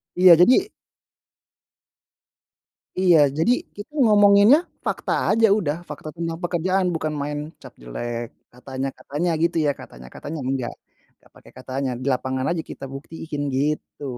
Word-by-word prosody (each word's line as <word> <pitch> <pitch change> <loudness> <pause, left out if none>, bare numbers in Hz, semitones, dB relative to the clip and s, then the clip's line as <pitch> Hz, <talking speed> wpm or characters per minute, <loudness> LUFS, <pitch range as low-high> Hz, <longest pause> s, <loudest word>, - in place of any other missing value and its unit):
Iya, 180 -1 +8
jadi 260 - +4 2.3
Iya, 180 -3 +5 0.2
jadi 165 +9 +3 0.2
kita 205 +7 -9
ngomonginnya 205 +3 +6 0.3
fakta - - -2 0.2
aja 225 +1 +4
udah, 155 -8 -1
fakta 150 +1 -7
tentang 165 -1 -4
pekerjaan 185 +2 0
bukan 155 -1 -2
main 145 +1 -3 0.2
cap - - -12
jelek, 120 - -5 0.3
katanya 130 +2 -5
katanya 155 +5 -3
gitu 170 0 +1
ya, 145 - +3
katanya 60 0 -12
katanya, 155 +1 -6
enggak, 130 -2 -2 0.5
nggak - - -26
pakai - - -17
katanya. 130 +1 -3
Di - - -4
lapangan 130 +1 -2
aja 170 -2 -1
kita - - -8
buktiin, 150 +1 -7
gitu. 150 +1 -2
155 Hz, 135 wpm, -22 LUFS, 135-185 Hz, 2.3 s, Iya